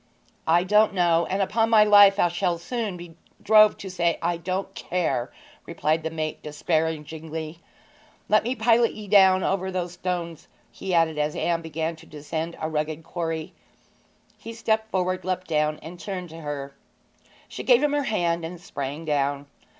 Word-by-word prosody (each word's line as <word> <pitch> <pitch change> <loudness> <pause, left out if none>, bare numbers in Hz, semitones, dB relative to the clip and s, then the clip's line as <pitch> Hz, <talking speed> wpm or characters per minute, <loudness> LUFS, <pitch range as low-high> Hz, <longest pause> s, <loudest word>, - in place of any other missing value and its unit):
'I 170 +2 +4
don't 210 +3 +3
know, 170 -2 +2
and, 195 +1 +1
upon 225 +3 +1
my 220 -2 +6
life, 205 -1 +7
I 175 - +4
shall 175 0 -1
soon 210 +1 -4
be 175 -1 -11 0.3
drove 215 0 +6
to 195 - -8
say 170 -2 0
I 170 +1 0
don't 185 +3 -4
care!' 170 -11 -2 0.4
replied 160 -1 0
the 160 - -3
mate 155 -1 -4
despairingly. 160 +1 -3 0.7
'Let 215 0 +4
me 245 +3 -2
pilot 230 0 +3
ye 210 -1 -9
down 190 -2 +5
over 190 0 -1
those 180 -2 -3
stones,' 175 -2 -4 0.2
he 190 - -6
added, 160 -2 +2
as 150 0 -1
Anne 170 -1 0
began 160 0 -3
to 160 +1 -16
descend 160 +3 -5
a 155 - -2
rugged 155 0 -3
quarry. 165 -1 -4 0.9
He 230 - -8
stepped 220 -1 -1
forward, 185 -1 -1
leapt 185 0 -2
down, 150 -1 0
and 170 +3 -9
turned 185 -3 -5
to 165 +1 -10
her. 140 -2 -5 0.7
She - - -7
gave 250 +1 +4
him 295 -1 +2
her 290 - +1
hand 170 -7 0
and 170 +2 -6
sprang 145 -1 -6
down. 145 -1 0
170 Hz, 170 wpm, -25 LUFS, 160-195 Hz, 0.9 s, life